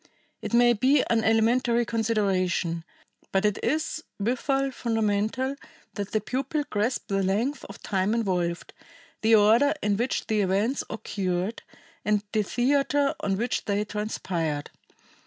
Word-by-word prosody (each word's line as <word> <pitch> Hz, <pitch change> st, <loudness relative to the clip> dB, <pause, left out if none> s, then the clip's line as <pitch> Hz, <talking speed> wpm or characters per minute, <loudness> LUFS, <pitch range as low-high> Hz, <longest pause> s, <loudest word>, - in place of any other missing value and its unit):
It -, -, -5 dB
may 240 Hz, 0 st, +5 dB
be 260 Hz, +5 st, +3 dB
an 225 Hz, -1 st, +2 dB
elementary 235 Hz, +2 st, +3 dB
consideration, 195 Hz, -7 st, 0 dB, 0.5 s
but 195 Hz, +2 st, +1 dB
it 210 Hz, -1 st, +1 dB
is 315 Hz, +1 st, -1 dB, 0.2 s
withal 270 Hz, +5 st, 0 dB
fundamental, 225 Hz, +2 st, 0 dB, 0.4 s
that 205 Hz, -1 st, -5 dB
the 215 Hz, -, +2 dB
pupil 270 Hz, +7 st, -2 dB
grasp 215 Hz, +5 st, -1 dB
the 195 Hz, 0 st, +1 dB
length 220 Hz, +9 st, 0 dB
of 200 Hz, -, -12 dB
time 195 Hz, +3 st, 0 dB
involved, 180 Hz, -6 st, -1 dB, 0.5 s
the 225 Hz, 0 st, +5 dB
order 225 Hz, +8 st, +5 dB
in 205 Hz, -1 st, +1 dB
which 240 Hz, +3 st, -1 dB
the 215 Hz, -1 st, +1 dB
events 200 Hz, +7 st, +1 dB
occurred, 190 Hz, -1 st, -3 dB, 0.4 s
and 210 Hz, -1 st, +1 dB
the 215 Hz, -, +2 dB
theater 275 Hz, +5 st, +1 dB
on 195 Hz, -1 st, -1 dB
which 235 Hz, +4 st, -1 dB
they 205 Hz, 0 st, 0 dB
transpired. 175 Hz, -8 st, -3 dB
220 Hz, 135 wpm, -26 LUFS, 200-245 Hz, 0.5 s, may